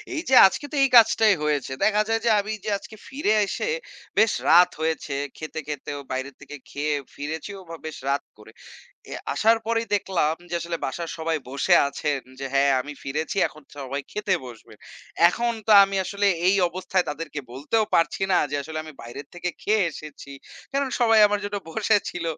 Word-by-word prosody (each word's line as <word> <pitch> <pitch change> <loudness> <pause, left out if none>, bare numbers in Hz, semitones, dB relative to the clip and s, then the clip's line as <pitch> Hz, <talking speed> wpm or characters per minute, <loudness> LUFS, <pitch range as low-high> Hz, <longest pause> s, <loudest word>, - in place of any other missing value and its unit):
এই 315 - -1
যে - - +1
আজকে 190 +9 -5
তো - - -5
এই 275 - +3
কাজটাই 220 -1 +6
হয়েছে। 145 -3 -1
দেখা 210 0 +3
যায় 225 0 +1
যে - - +4
আমি 205 +1 -3
যে, - - -1
আজকে 220 - -12
ফিরে 265 -6 0
এসে 480 - -3 0.5
বেশ 220 +1 +5 0.2
রাত 175 +2 +7
হয়েছে 160 -2 -2 0.2
খেতে 155 0 -6
খেতেও 145 -1 -5
বাইরে 130 +2 -3
থেকে 140 +1 -10
খেয়ে 150 +1 -2 0.2
ফিরেছিও 160 +7 -6
বা 165 - -6
বেশ 155 - -6
রাত 140 +1 0
করে। 105 +1 -15 0.6
এ - - -3 0.2
আসার 225 +1 +4
পরেই 230 0 0
দেখলাম 180 -6 0 0.2
যে - - -3
আসলে 170 0 -3
বাসার 165 +5 -5
সবাই 160 0 -1
বসে 140 +1 +2
আছেন 140 0 -2 0.2
যে - - -4
হ্যাঁ 140 0 +4
আমি 145 +3 -6
ফিরেছি 150 +6 -3
এখন 155 - -16
সবাই 140 0 -4
খেতে 210 -2 0
বসবে। 120 -3 -13 0.5
এখন 235 +6 -1
তো 220 - +4
আমি 195 0 -4
আসলে 200 +2 -1 0.2
এই 200 - +4
অবস্থায় 185 +1 -1
তাদেরকে 150 0 -6
বলতেও 150 - 0
পারছি 165 +3 +1
না - - +5
যে 145 - -1
আসলে 155 +2 -6
আমি 155 - -10
বাইরের 120 +4 -9
থেকে 175 0 -3
খেয়ে 215 0 +2
এসেছি। 150 -2 -11 0.4
কারণ 275 0 0
সবাই 225 -2 +5
আমার 205 0 -1
জন্য 205 0 -3
বসে 215 +3 +2
ছিল। 175 -1 -6
165 Hz, 185 wpm, -24 LUFS, 145-210 Hz, 0.6 s, রাত